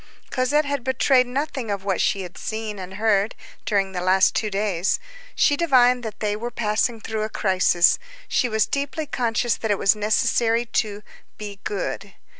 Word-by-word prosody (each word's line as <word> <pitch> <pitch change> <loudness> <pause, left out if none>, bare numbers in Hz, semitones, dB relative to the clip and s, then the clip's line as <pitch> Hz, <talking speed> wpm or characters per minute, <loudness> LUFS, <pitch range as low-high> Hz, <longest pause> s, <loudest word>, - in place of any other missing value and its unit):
Cosette 285 +4 +1
had 285 -3 -2
betrayed 260 0 +3
nothing 265 -2 -3
of 200 -1 -3
what 195 -3 0
she 195 - +1
had 180 -1 -10
seen 215 -2 -5
and 185 0 -8
heard 205 0 +1 0.3
during 195 -3 +1
the 180 -1 -4
last 185 +1 +4
two 215 - -1
days. 195 -3 0 0.4
She 290 - +3
divined 250 -6 +4
that 220 -3 -7
they 210 -1 0
were 235 +3 -4
passing 225 0 0
through 220 0 -4
a 215 - -2
crisis. 185 -4 +3 0.3
She 250 - +1
was 220 -1 +2
deeply 285 +2 -3
conscious 240 -4 0
that 220 - -3
it 205 - +2
was 195 - +3
necessary 225 +2 +1
to 210 -3 -2 0.3
"be 205 -2 -8
good." 200 -1 -4
220 Hz, 175 wpm, -23 LUFS, 200-245 Hz, 0.4 s, last